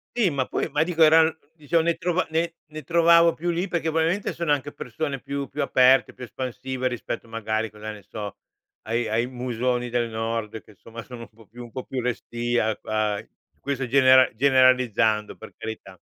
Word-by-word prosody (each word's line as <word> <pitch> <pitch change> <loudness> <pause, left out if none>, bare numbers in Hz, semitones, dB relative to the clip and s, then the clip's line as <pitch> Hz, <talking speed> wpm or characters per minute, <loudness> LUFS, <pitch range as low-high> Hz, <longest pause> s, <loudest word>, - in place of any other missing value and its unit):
Sì, 215 -9 +2
ma 130 -2 -1
poi - - -2
ma 150 +2 +1
dico 165 -1 +2
eran 160 +1 +6 0.2
diciamo 165 +1 0
ne 170 0 +1
trova 180 +1 0
ne 165 +1 -1
ne 155 0 -8
trovavo 170 +2 +5
più 175 +2 -2
lì 175 +3 -1
perché 165 -2 -1
probabilmente 165 +5 0
sono 170 -3 -2
anche 145 0 0
persone 135 +3 -4
più 140 0 -4
più 145 +4 -4
aperte, 130 -1 +4
più - - -11
espansive 130 +2 -4
rispetto 125 -1 -5
magari 110 0 -2
cosa 105 0 -8
ne 105 -1 -11
so, 105 0 -7 0.5
ai 115 +1 0
ai 115 +3 0
musoni 125 -1 -2
del 120 -1 -1
Nord, 110 -1 -4
che - - -18
insomma 115 +3 -11
sono 125 -2 -10
un 115 - -9
po' 115 0 -20
più 120 +3 -11
un 120 - -12
po' 130 - -6
più 130 -1 -4
restii 120 0 -2
a 110 -2 +1
a 110 -1 -1 0.4
questo 135 -2 -3
genera 130 0 +6
generalizzando 125 -5 +3
per - - -12
carità. 95 -4 -8
130 Hz, 190 wpm, -24 LUFS, 115-155 Hz, 0.5 s, eran